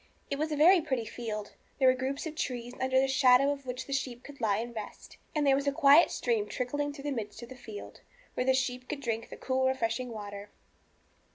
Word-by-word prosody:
It 280 - -1
was 310 +1 -1
a - - 0
very 340 +5 +6
pretty 260 -6 -2
field; 215 -2 -5 0.3
there 265 - +4
were 255 - +7
groups 265 +3 -3
of 320 - -4
trees, 245 -7 -4
under 260 0 +3
the 270 - +3
shadow 265 +1 +5
of 280 -2 -6
which 250 0 -4
the 275 - -5
sheep 255 -2 -3
could 285 -2 -12
lie 205 -3 +2
and 235 +2 -4
rest; 215 -2 -8 0.2
and 300 -1 +2
there 275 - +5
was 280 +1 -1
a - - +4
quiet 290 +2 +6
stream 225 -4 0
trickling 290 +6 -2
through 285 -1 -10
the 290 - -2
midst 220 -2 -5
of 235 - -10
the 260 - -9
field, 220 -4 -10 0.3
where - - -1
the 260 - +5
sheep 250 -1 -2
could 300 - -3
drink 230 -4 -3
the - - -9
cool, 260 0 0
refreshing 250 -1 -1
water. 205 -2 -7
260 Hz, 235 wpm, -30 LUFS, 235-280 Hz, 0.3 s, were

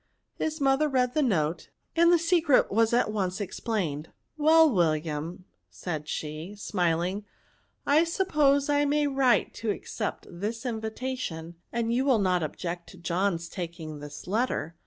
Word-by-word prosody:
His 315 0 -2
mother 275 +2 +3
read 250 -2 +1
the 305 - +2
note, 170 - 0 0.3
and 340 +1 +5
the 350 - +6
secret 335 -4 +3
was 225 +2 +3
at 240 -2 +2
once 190 -2 -2
ex 205 - -5
plained. 165 -10 -2 0.2
" - - -49
Well, 320 +1 +6
William," 160 0 -1 0.2
said 155 -4 -5
she, 155 +6 -5
smiling, 180 0 -1 0.6
I 295 +3 +5
suppose 300 -6 +2
I 290 0 +3
may 295 +1 +2
write 270 -3 +2
to 225 - -1
accept 210 +1 -3
this 220 +7 -5
in 225 -3 -2
vitation, 220 -8 -4 0.2
and 235 0 -1
you 255 +2 +2
will 265 -4 +4
not 185 -3 +2
object 170 +2 -4
to 185 - -13
John's 170 0 -1
taking 165 -4 -6
this 145 0 -9
letter." 190 - -1
210 Hz, 155 wpm, -27 LUFS, 170-270 Hz, 0.6 s, the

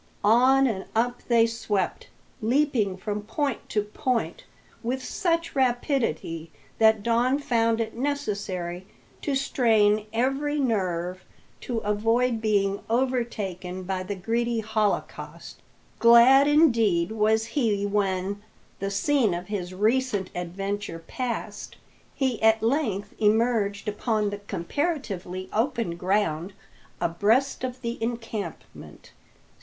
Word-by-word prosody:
On 255 +6 +5
and 205 -7 -1
up 245 +2 0
they 235 -2 +5
swept, 220 -5 -2 0.3
leaping 230 -5 +1
from 210 +2 -3
point 275 +3 -3
to 210 - 0
point 250 - -2 0.4
with 255 +2 -2
such 335 -2 -1
rapidity 240 - 0 0.3
that 220 -2 +5
Don 240 +4 +2
found 230 -5 +1
it 225 -1 -2
necessary 205 -10 -3 0.3
to 285 - -1
strain 215 -5 +2
every 270 +6 0
nerve 185 -7 -1 0.4
to 240 - -4
avoid 225 +3 +1
being 200 -2 +1
overtaken 220 -7 -2
by 185 0 -2
the 185 +2 -4
greedy 230 +4 -1
holocaust. 215 -1 -2 0.4
Glad 235 +4 +7
indeed 230 - +3
was 220 0 +2
he 220 -7 0
when, 200 -1 -1 0.4
the 195 - -2
scene 215 0 +2
of 180 +2 -7
his 185 -4 -3
recent 210 0 0
adventure 195 +1 -4
passed, 250 -2 -5 0.4
he 260 -4 -1
at 220 0 +4
length 225 -6 0
emerged 215 -2 +1
upon 210 0 0
the 205 - -5
comparatively 195 - -3
open 225 -6 0
ground 185 -1 0 0.5
abreast 210 +12 +1
of 255 0 -4
the 235 0 -4
encampment. 225 -6 -6
220 Hz, 110 wpm, -26 LUFS, 200-245 Hz, 0.5 s, Glad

